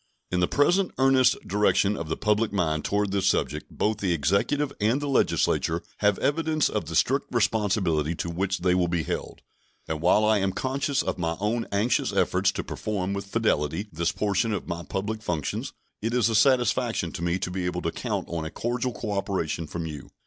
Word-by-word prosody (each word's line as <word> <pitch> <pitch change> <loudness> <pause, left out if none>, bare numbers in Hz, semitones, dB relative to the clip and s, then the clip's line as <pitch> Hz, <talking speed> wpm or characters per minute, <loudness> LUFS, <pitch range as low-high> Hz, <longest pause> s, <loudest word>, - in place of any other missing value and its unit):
In 90 - +1
the 90 - +3
present 175 +6 +3
earnest 135 -1 +4
direction 105 0 +2
of 85 -4 -5
the 80 - -1
public 105 +1 +1
mind 80 -6 0
toward 100 -1 0
this 100 -1 +1
subject - - 0
both 110 0 -1
the 95 -4 +1
Executive 100 - +1
and 115 +6 +2
the 145 - -3
Legislature 85 -10 +1
have 105 -1 +2
evidence 155 +1 +1
of - - -2
the 80 +2 -5
strict 135 - +2
responsibility 95 -9 +1
to 85 - -4
which 95 +2 -1
they 90 0 +3
will 90 -1 +2
be 85 -2 0
held; - - -5 0.4
and 80 -1 -3
while 100 +5 +4
I 110 -1 +4
am 95 -1 0
conscious 135 +1 -1
of - - -3
my 80 -1 -1
own 115 +3 -1
anxious 105 +5 +1
efforts - - +2
to - - -3
perform 100 -3 -3
with 100 0 -4
fidelity 100 -3 0
this 85 +1 0
portion 105 +2 0
of 100 - -4
my 85 0 -3
public 105 +5 -4
functions, 80 -8 -3 0.3
it 115 +3 -1
is 120 -2 +3
a - - -1
satisfaction 120 - +2
to - - -6
me 85 +1 0
to 90 - -4
be 90 -1 -2
able 90 0 -3
to 85 - 0
count - - -3
on 85 -2 -3
a 80 - -4
cordial 120 +5 -2
cooperation 95 -7 -2
from 85 +2 -4
you. 75 -4 -7
100 Hz, 200 wpm, -26 LUFS, 85-115 Hz, 0.4 s, earnest